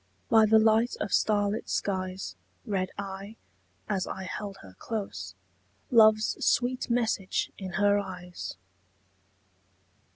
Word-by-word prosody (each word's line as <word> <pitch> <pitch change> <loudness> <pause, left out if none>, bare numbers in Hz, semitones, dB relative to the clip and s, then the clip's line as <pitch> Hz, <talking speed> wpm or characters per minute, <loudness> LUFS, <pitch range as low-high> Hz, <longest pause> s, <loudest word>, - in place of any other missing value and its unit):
By 220 -1 +6
the 220 +1 +6
light 220 +2 +4
of - - -3
starlit 205 0 +1
skies 185 - -2 0.3
Read 185 -3 -1
I, 195 +2 -6 0.5
as 195 -3 -1
I 190 - -5
held 200 +1 -5
her 95 -1 -13
close, 95 - -5 0.6
Love's 215 -2 +5
sweet 250 +1 +1
message 225 -5 0
in 190 -2 -6
her 205 +1 +3
eyes. 180 - -7
205 Hz, 110 wpm, -28 LUFS, 185-220 Hz, 0.6 s, By